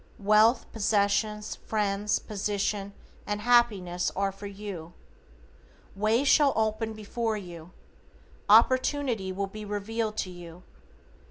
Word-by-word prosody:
Wealth, 215 +4 +4
possessions, 210 0 0
friends, 205 -1 -1
position 200 -1 -3 0.3
and 205 0 -2
happiness 210 -7 +2
are 195 0 0
for 195 +1 -9
you. 195 -5 -8 1.0
Ways 220 +7 +1
shall 285 0 +5
open 220 0 -1
before 220 +1 -3
you. 175 -4 -10 0.8
Opportunity 245 -2 +3
will 195 +2 -2
be 215 +2 -9
revealed 215 +2 -3
to 185 - -2
you. 175 0 -11
210 Hz, 105 wpm, -27 LUFS, 195-220 Hz, 1.0 s, shall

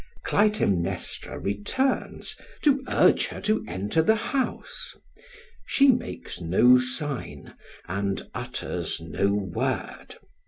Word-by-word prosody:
Clytemnestra 205 - 0
returns 105 - -1 0.3
to 280 -3 +3
urge - - +4
her - - -7
to 215 +1 +1
enter 100 - 0
the 220 +7 +4
house; 260 +4 -3 0.7
she 275 0 +5
makes 240 - -1
no 120 +10 +6
sign 135 +2 -3 0.3
and 100 +2 -2
utters - - -3
no 85 +4 -1
word. 100 -4 -3
125 Hz, 95 wpm, -26 LUFS, -, 0.7 s, no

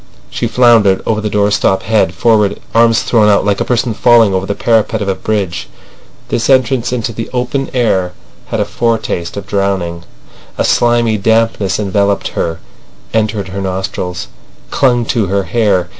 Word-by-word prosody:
She - - -2
floundered 115 -6 +3
over 110 -1 0
the 105 - -2
doorstep 100 -1 +1
head 110 0 +1
forward, 110 -4 +2
arms 115 -1 +3
thrown 110 -3 +3
out, 100 -1 +3
like 100 -1 0
a - - +3
person 120 -1 0
falling 115 -2 +4
over 95 +1 -1
the 100 - -2
parapet 115 -2 +1
of 105 - -3
a 95 - +1
bridge. 100 -4 -3 0.6
This 115 - -1
entrance 130 -2 +2
into 120 -1 -2
the 115 +1 -6
open 125 +2 -2
air 95 -8 0 0.3
had - - -3
a - - +1
foretaste 110 -7 -2
of 100 - -5
drowning; 95 -4 -2 0.5
a - - +1
slimy 120 -2 +2
dampness 110 -3 +1
enveloped 100 -1 0
her, 80 -1 -3 0.6
entered 105 -3 -1
her 100 +2 -5
nostrils, 95 -1 -4 0.4
clung 120 -4 +2
to 110 -3 0
her 100 +1 0
hair. 100 -5 +1
105 Hz, 160 wpm, -13 LUFS, 95-115 Hz, 0.6 s, falling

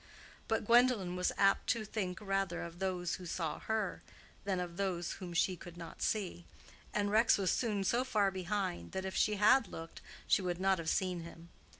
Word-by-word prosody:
But - - 0
Gwendolen 235 -7 +4
was 180 0 +1
apt 195 0 +3
to 225 -2 +1
think 195 -4 -3
rather 195 -3 -1
of 170 0 -8
those 180 -2 -1
who 180 -2 -9
saw 165 -2 -2
her 220 -3 -2 0.4
than 190 -2 0
of 175 -1 -4
those 180 -3 -1
whom 180 -2 -7
she 180 +2 +2
could 175 0 -11
not 165 -1 -9
see; 190 -5 -1 0.5
and 205 -1 0
Rex 220 +2 +5
was 195 -2 +1
soon 210 -5 0
so 235 +6 +2
far 210 -6 +2
behind 185 - -3
that 190 0 -3
if 190 - -4
she 210 - +2
had 215 +7 +5
looked 165 0 -9 0.2
she - - +3
would 180 -1 -2
not 190 -1 +2
have 165 -1 -2
seen 185 -2 0
him. 170 0 -11
190 Hz, 195 wpm, -34 LUFS, 175-205 Hz, 0.5 s, Rex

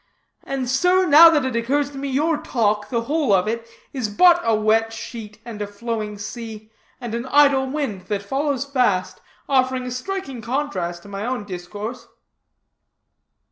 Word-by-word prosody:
and, 270 -2 -3
sir, 360 +9 +3
now 330 +1 +9
that 300 -5 +2
it 260 -3 -2
occurs 280 +5 0
to 280 - -10
me, 280 - -3
your 300 +4 +1
talk, 210 -3 0
the 235 -2 0
whole 295 -2 0
of 190 0 +3
it, 230 +1 -3 0.3
is 250 -6 -2
but 345 - +5
a 225 -1 +2
wet 220 +1 +2
sheet 225 -2 -8
and 220 -3 -7
a 205 - -2
flowing 210 0 -4
sea, 215 0 -8 0.3
and 240 -3 -6
an 235 +2 -3
idle 280 -1 +4
wind 270 -10 -3
that 205 0 -2
follows 275 +4 -1
fast, 205 -9 0 0.3
offering 260 -1 +1
a 250 - -5
striking 270 -2 -5
contrast 200 -9 -3
to - - -13
my 200 0 -5
own 245 -2 -2
discourse." 205 +5 -7
235 Hz, 170 wpm, -22 LUFS, 210-275 Hz, 0.3 s, now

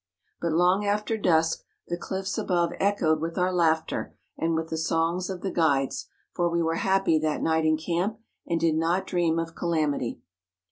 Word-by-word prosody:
But 170 -2 0
long 180 +4 +3
after 210 +2 0
dusk 165 -6 +2 0.2
the 175 - -1
cliffs 190 +2 -4
above 175 -2 0
echoed 160 -6 +2
with 165 +2 -3
our 180 0 +1
laughter, 160 -2 0 0.2
and 165 0 0
with 160 0 -2
the 160 - -2
songs 165 +3 0
of 185 -2 -5
the 195 - -2
guides; 140 -5 +1 0.3
for 175 -1 +1
we 170 0 +1
were 165 0 0
happy 195 -4 +3
that 155 -1 -1
night 160 0 +2
in 155 0 +3
camp, 175 +6 -1 0.3
and 170 -1 0
did 165 -1 +2
not 170 +4 +1
dream 170 -3 +1
of 165 0 -2
calamity. 155 -8 -1
170 Hz, 180 wpm, -26 LUFS, 160-180 Hz, 0.3 s, long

